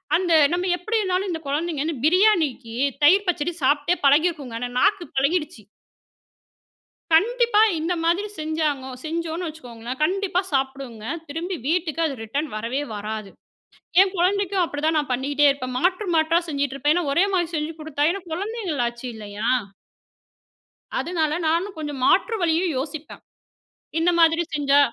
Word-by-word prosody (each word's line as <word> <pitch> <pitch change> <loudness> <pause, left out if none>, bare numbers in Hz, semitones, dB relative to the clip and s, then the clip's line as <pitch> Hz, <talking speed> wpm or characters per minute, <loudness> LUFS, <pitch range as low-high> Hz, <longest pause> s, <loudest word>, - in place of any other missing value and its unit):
அந்த 350 0 +1 0.2
நம்ப 355 +1 0
எப்படின்னாலும் 385 -1 -1
இந்த 325 -2 -4
குழந்தைங்கன்னு 310 +1 -1
பிரியாணிக்கு 320 - +2 0.3
தயிர் 385 +7 +5
பச்சடி 350 -1 0
சாப்ட்டே 290 +6 +2
பழகியிருக்குங்க. 285 -4 +2
ஏன்னா 245 0 -3
நாக்கு 395 0 +2
பழகிடுச்சு. 290 -3 0 1.5
கண்டிப்பா 470 +4 +4 0.2
இந்த 330 +3 -1
மாதிரி 350 +5 +1
செஞ்சாங்கோ 305 -4 -2
செஞ்சோன்னு 335 +2 -3
வச்சுக்கோங்களேன், 245 -5 -8
கண்டிப்பா 370 +2 +1
சாப்பிடுங்க. 265 -5 -3 0.2
திரும்பி 335 +6 -4
வீட்டுக்கு 330 -1 0
அது 290 -4 -2
ரிட்டர்ன் 285 +8 -3
வரவே 230 +6 -2
வராது. 210 -1 -5 0.7
என் 385 0 0
குழந்தைக்கும் 385 +1 +1
அப்படிதான் 315 0 -1
நான் 290 -3 -2
பண்ணிக்ட்டே 285 +3 +2
இருப்பேன். 255 -2 -4
மாற்று 365 +7 +1
மாற்றா 320 +2 +3
செஞ்சுகிட்டு 280 -2 -2
இருப்பேன். 295 +3 +2
ஏன்னா 350 -4 0
ஒரே 340 +7 +4
மாரி 350 -3 +1
செஞ்சு 305 +1 -2
குடுத்தா 305 -2 -2
ஏன்னா 395 0 -6
குழந்தைங்களாச்சி 320 - -3
இல்லையா? 210 +1 -5 1.5
அதுனால 320 -3 -1
நானும் 345 +5 0
கொஞ்சம் 295 -4 -5
மாற்று 455 - +3
வழியும் 335 0 +1
யோசிப்பேன். 295 +3 -6 0.8
இந்த 335 +2 +3
மாதிரி 330 0 +4
செஞ்சா 285 -1 +3
315 Hz, 130 wpm, -23 LUFS, 275-355 Hz, 1.5 s, தயிர்